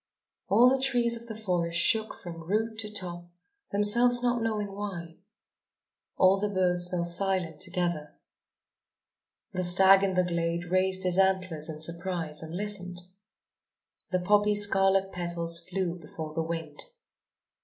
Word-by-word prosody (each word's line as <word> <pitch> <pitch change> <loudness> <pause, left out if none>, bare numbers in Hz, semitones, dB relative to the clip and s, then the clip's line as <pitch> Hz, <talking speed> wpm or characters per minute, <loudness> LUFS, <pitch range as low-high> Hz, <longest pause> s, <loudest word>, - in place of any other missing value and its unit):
All 230 +5 +5
the 265 +1 +2
trees 240 -3 +1
of 235 0 -11
the 220 -2 -8
forest 175 -5 -2
shook 220 +4 +1
from 170 -2 -10
root 215 +6 -2
to 210 -1 -3
top, 175 -4 -6 0.4
themselves 240 +4 +5
not 240 -1 0
knowing 210 -3 -2
why. 185 -5 -7 1.0
All 190 +1 +4
the 210 +1 -1
birds 180 -2 0
fell 175 -1 -2
silent 175 -3 0
together. 175 -5 -2 1.4
The 185 - -2
stag 190 +2 +6
in 195 -1 -1
the 180 - +3
glade 170 0 -2
raised 185 0 +1
his 180 0 0
antlers 185 -5 0
in 155 -1 -8
surprise 170 -2 -5
and 160 +2 -7
listened. 185 -3 -1 1.1
The 185 - 0
poppy's 205 +2 +4
scarlet 195 -1 +2
petals 170 -1 0
flew 180 -2 -3
before 155 -1 -9
the 165 - -2
wind. 160 -2 -5
185 Hz, 140 wpm, -27 LUFS, 170-205 Hz, 1.4 s, stag